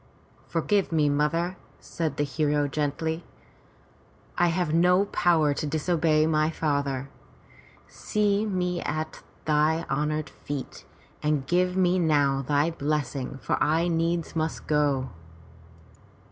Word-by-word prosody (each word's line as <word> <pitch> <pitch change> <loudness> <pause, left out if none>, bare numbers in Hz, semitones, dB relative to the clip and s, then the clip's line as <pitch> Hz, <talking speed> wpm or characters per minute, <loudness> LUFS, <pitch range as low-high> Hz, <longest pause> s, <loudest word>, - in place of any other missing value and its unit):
Forgive 190 +4 0
me, 155 -3 +3
mother," 165 +5 0 0.2
said 155 -4 -4
the 145 - +1
hero 145 0 0
gently. 155 +3 -2 1.1
"I 175 - +3
have 170 -2 0
no 180 +4 +4
power 165 -6 +2
to 150 - -3
disobey 155 0 +2
my 155 -1 +2
father. 140 -4 -1 0.8
See 210 -1 0
me 180 -4 -1
at 155 +1 -4 0.2
thy 155 +2 +2
honored 150 +2 -1
feet 145 -2 -7 0.4
and 150 -3 0
give 180 +4 +1
me 185 0 +3
now 145 -5 +2
thy 145 +4 +1
blessing, 145 -4 -2
for - - -1
I 160 +4 +2
needs 170 0 -1
must 160 0 -2
go." 140 -4 +1
155 Hz, 120 wpm, -26 LUFS, 145-170 Hz, 1.1 s, no